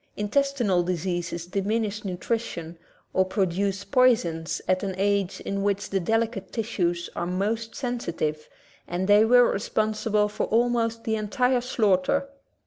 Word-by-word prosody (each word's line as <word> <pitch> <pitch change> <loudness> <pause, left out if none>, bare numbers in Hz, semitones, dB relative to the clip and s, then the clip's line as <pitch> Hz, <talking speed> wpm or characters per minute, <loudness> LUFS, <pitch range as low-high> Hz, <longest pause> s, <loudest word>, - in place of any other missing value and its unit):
Intestinal 230 -3 +1
diseases 175 -1 -2
diminish 210 +3 -1
nutrition 180 -3 -3
^ - - -23 0.4
or 190 - +4
produce 195 +1 -1
poisons 230 -12 +2
at 185 0 +2
an 195 -2 -3
age 200 -1 0
in 200 0 -3
which 200 0 -1
the 195 - +1
delicate 220 0 -1
tissues 180 -7 -1
are 175 - -2
most 215 +5 -2
sensitive 170 - -3 0.4
and 180 +2 -2
they 205 +1 +6
were 245 +2 +6
responsible 215 0 0
for 210 - -3
almost 230 0 +1
the 220 - 0
entire 250 +4 +1
slaughter. 235 +2 +1
205 Hz, 135 wpm, -26 LUFS, 185-230 Hz, 0.4 s, they